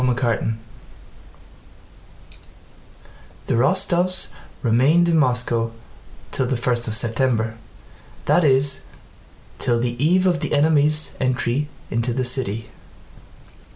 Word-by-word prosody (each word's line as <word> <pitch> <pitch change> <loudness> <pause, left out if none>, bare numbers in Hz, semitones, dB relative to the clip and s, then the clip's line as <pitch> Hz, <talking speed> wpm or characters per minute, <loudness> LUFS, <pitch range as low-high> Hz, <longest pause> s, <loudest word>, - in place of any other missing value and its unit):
CHAPTER 125 -3 +1
XII 115 - -1 2.9
The - - -1
Rostóvs 180 +7 +2 0.3
remained 135 +9 +3
in 165 -1 +3
Moscow 120 -4 +1 0.6
till 130 - 0
the 130 -1 -1
first 120 0 0
of 110 - 0
September, 115 -1 0 0.7
that 175 - +3
is, 140 -1 +2 0.8
till 120 -1 +1
the 120 +2 -2
eve 180 +4 +3
of 175 -3 +2
the - - -3
enemy's 150 +1 +2
entry 130 +2 -1 0.2
into 115 +1 0
the 130 +1 -1
city. 120 -4 -1
130 Hz, 105 wpm, -21 LUFS, 120-150 Hz, 2.9 s, remained